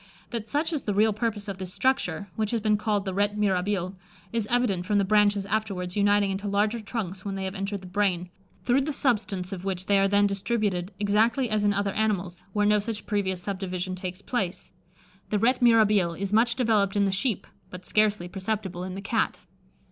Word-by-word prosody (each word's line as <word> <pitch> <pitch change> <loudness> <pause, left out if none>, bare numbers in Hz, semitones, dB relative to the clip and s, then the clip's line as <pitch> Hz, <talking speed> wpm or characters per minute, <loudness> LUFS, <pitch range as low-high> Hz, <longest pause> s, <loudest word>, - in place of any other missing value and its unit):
That 230 -2 -4
such 310 +6 0
is 300 - -1
the 205 -4 -2
real 215 +1 +4
purpose 215 -1 -2
of 195 -1 -5
this 185 -1 -4
structure, 200 -9 0
which 215 -2 -1
has 235 - 0
been 215 0 +2
called 210 -1 0
the 190 - -2
rete 205 +2 +1
mirabile, 190 -2 0 0.4
is 225 -3 -1
evident 235 -7 +1
from 205 +2 +1
the 200 - +3
branches 205 -1 +3
afterwards 195 -4 -2
uniting 205 -1 +3
into 195 +2 -3
larger 210 +3 +1
trunks 200 -4 -5
when 200 -1 -4
they 195 - -3
have 190 0 -3
entered 195 0 -3
the - - -11
brain, 180 -2 0 0.3
through 255 +3 +3
the 295 +2 -2
substance 205 -8 0
of 185 -2 -6
which 190 -1 -3
they 200 0 +3
are 195 - +4
then 205 +1 +4
distributed 200 -2 -1
exactly 220 +4 +2
as 215 -1 +1
in 205 - +4
other 200 -1 0
animals, 190 -5 -1
where 205 +1 +1
no 210 0 +4
such 210 0 -5
previous 190 -3 -1
subdivision 185 -2 -3
takes 185 +1 -6
place. 195 -7 -3 0.6
The 210 - +1
rete 245 +5 +2
mirabile 210 -7 +4
is 200 +2 -3
much 235 +2 +4
developed 215 -6 +2
in 200 -1 +3
the 195 - +1
sheep, 200 +2 -1 0.2
but 180 0 -9
scarcely 210 -4 +2
perceptible 190 -1 -3
in 185 0 -5
the 195 - -5
Cat. 220 +3 -1
205 Hz, 205 wpm, -26 LUFS, 190-215 Hz, 0.6 s, real